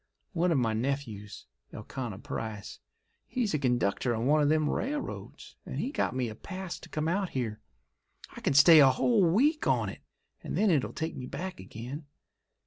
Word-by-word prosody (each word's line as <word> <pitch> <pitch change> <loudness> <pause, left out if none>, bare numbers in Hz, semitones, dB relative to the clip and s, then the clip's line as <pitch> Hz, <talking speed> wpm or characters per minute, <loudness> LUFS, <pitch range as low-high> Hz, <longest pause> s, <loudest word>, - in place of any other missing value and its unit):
One 175 0 +2
of 160 - +3
my 115 -4 +1
nephews, 110 -4 -3 0.3
Elkanah 120 -7 -6
Price, 110 -2 -6 0.5
he's 240 -4 -1
a 150 - +1
conductor 120 -2 +1
on 115 +2 -2
one 150 +3 +4
of 145 - +3
them 155 -1 +3
railroads 290 - -4
and - - -6
he 265 - -2
got 210 - -1
me 130 -2 0
a 110 - -5
pass 185 - -7
to - - -13
come 155 0 -2
out 190 +2 0
here. 115 -5 -3 0.8
I - - -9
can - - 0
stay 160 +2 +9
a 135 -2 +8
whole 205 - +3
week 290 - +2
on - - +2
it, - - -9 0.4
and - - -4
then 215 -2 +4
it'll 145 -6 +1
take 160 0 -4
me 125 - -6
back 185 +6 -5
again. 125 - -8
145 Hz, 185 wpm, -29 LUFS, 120-180 Hz, 0.8 s, stay